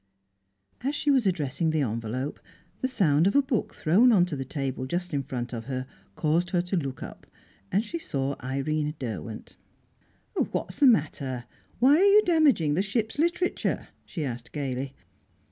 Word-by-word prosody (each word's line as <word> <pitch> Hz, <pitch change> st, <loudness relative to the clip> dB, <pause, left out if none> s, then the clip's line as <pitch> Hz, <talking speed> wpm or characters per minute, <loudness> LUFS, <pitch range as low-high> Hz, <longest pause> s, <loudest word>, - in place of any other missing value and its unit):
As 280 Hz, +3 st, 0 dB
she 290 Hz, 0 st, +2 dB
was 260 Hz, -6 st, +3 dB
addressing 160 Hz, -2 st, 0 dB
the 155 Hz, -1 st, +1 dB
envelope, 115 Hz, +4 st, -3 dB, 0.4 s
the 260 Hz, -, +1 dB
sound 175 Hz, -, +3 dB
of 200 Hz, -, +1 dB
a 285 Hz, -, +7 dB
book 265 Hz, -5 st, -2 dB
thrown 210 Hz, +11 st, +5 dB
on 185 Hz, -6 st, +5 dB
to 175 Hz, -4 st, -4 dB
the 135 Hz, -, -3 dB
table 135 Hz, -1 st, -3 dB
just 175 Hz, +3 st, -3 dB
in 140 Hz, -, +1 dB
front 125 Hz, -2 st, -5 dB
of 115 Hz, -1 st, -5 dB
her 130 Hz, 0 st, -3 dB, 0.3 s
caused 165 Hz, +3 st, +1 dB
her 180 Hz, -2 st, +2 dB
to 180 Hz, +2 st, -2 dB
look 135 Hz, -7 st, -3 dB
up, -, -, -10 dB, 0.4 s
and 205 Hz, +4 st, +2 dB
she 335 Hz, -, -4 dB
saw 140 Hz, -, -2 dB
Irene 150 Hz, +4 st, -1 dB
Derwent. 110 Hz, -, -6 dB, 0.8 s
"What's 180 Hz, -, -2 dB
the 280 Hz, -, +7 dB
matter? 140 Hz, -, +1 dB, 0.3 s
Why 270 Hz, +5 st, +6 dB
are 365 Hz, -, +4 dB
you 405 Hz, +1 st, +7 dB
damaging 290 Hz, -, +4 dB
the 170 Hz, -, +2 dB
ship's 220 Hz, +5 st, -2 dB
literature?" 345 Hz, +2 st, 0 dB
she 160 Hz, -5 st, -4 dB
asked 120 Hz, -2 st, -6 dB
gaily. 135 Hz, -2 st, -3 dB
155 Hz, 170 wpm, -27 LUFS, 135-225 Hz, 0.8 s, a